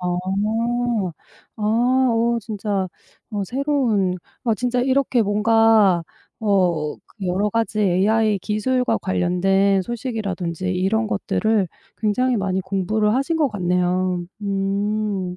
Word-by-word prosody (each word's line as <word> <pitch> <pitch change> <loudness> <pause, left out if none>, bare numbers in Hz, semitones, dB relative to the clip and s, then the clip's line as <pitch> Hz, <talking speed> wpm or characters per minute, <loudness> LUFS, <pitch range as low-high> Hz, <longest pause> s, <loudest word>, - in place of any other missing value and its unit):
아. 180 - -3 1.5
아 215 - -7 0.5
어 235 +1 +1
진짜 205 -3 -2 0.4
어 205 -2 -2
새로운 240 -7 0 0.3
아 230 -3 +2
진짜 245 +2 -1
이렇게 260 -1 +2
뭔가 210 -3 +4 0.4
어 180 -8 +1 0.2
그 195 - -5
여러 195 +4 +1
가지 225 0 -1
AI 210 +3 +2
기술과 250 +5 0
관련된 190 +2 +2
소식이라든지 195 -6 -4
이런 195 +5 +1
것들을 215 -1 0 0.3
굉장히 245 +4 +1
많이 190 -2 -1
공부를 200 +3 0
하신 275 +6 0
것 295 -4 +3
같네요. 180 -2 0 0.2
음. 200 -1 -1
205 Hz, 225 characters per minute, -21 LUFS, 185-225 Hz, 1.5 s, 뭔가